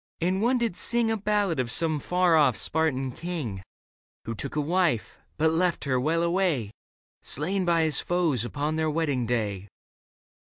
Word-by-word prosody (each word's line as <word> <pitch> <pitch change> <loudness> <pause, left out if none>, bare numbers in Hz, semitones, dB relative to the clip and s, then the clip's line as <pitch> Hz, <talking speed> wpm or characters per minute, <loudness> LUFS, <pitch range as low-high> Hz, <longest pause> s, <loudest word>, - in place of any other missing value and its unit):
And 185 +3 0
one 245 +3 +2
did 235 -6 -1
sing 235 +1 +1
A - - +1
ballad 205 -6 0
of 125 -2 -1
some 155 +4 +3
far 180 +1 +2
off 145 -7 +4
Spartan 140 -5 0
king. 145 - -5 0.6
Who 115 - -3
took 135 +7 -4
a - - 0
wife, 160 - 0 0.2
but 160 +1 +2
left 175 +1 0
her, 130 -3 0
well 165 +6 +1
away! 170 - 0 0.5
Slain 185 +7 -1
by 170 -2 +2
his 155 -1 +3
foes 170 -9 0
upon 145 +5 -2
their 160 -1 0
wedding 145 -6 -1
day. 105 -5 -2
160 Hz, 165 wpm, -26 LUFS, 130-180 Hz, 0.6 s, off